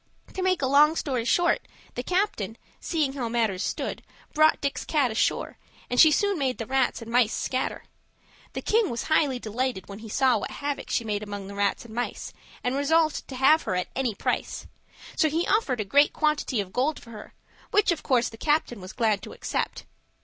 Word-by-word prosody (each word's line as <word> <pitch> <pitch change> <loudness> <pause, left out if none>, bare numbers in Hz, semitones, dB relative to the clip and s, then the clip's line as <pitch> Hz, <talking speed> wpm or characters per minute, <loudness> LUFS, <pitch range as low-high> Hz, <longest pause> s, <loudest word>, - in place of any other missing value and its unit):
To 380 - -4
make 370 -5 +1
a - - +4
long 295 +4 +5
story 255 -7 -2
short, 345 +7 +2 0.3
the 245 - -3
captain, 255 - -1 0.2
seeing 305 -5 -1
how 250 -4 -3
matters 225 -5 0
stood, - - -3 0.3
brought 310 +1 +4
Dick's 280 -1 -2
cat 280 -6 +1
ashore, 220 - -1 0.3
and 245 - +1
she 315 - +9
soon 400 +4 +1
made 260 -2 0
the 230 - -4
rats 260 -1 0
and 230 - -9
mice 235 -2 +3
scatter. 260 0 -2 0.7
The - - -5
king 440 -2 +2
was 235 - -3
highly 295 -4 +2
delighted 240 -2 -3
when 200 +1 -9
he 220 0 -10
saw 260 +3 +3
what - - -5
havoc 285 0 -4
she 235 - 0
made 210 -2 -2
among 205 -2 -6
the 200 - -8
rats 200 +3 -1
and 225 - -11
mice, 245 +2 -4 0.3
and 250 +1 0
resolved 310 +2 +1
to 265 - -7
have 275 +5 +5
her 185 - -2
at 180 - -2
any 255 -5 -1
price. - - -2 0.5
So 315 - +3
he 330 +3 0
offered 280 - +1
a 210 - -1
great 285 +8 +4
quantity 300 -6 0
of 190 -2 -9
gold 285 +5 0
for 230 - -14
her, 210 -2 -11 0.3
which, 415 -3 +3
of 335 - -2
course, 245 -3 +2
the 225 - -10
captain 295 -6 0
was 185 - -9
glad 220 -4 +1
to - - -9
accept. - - -3
260 Hz, 205 wpm, -26 LUFS, 225-305 Hz, 0.7 s, she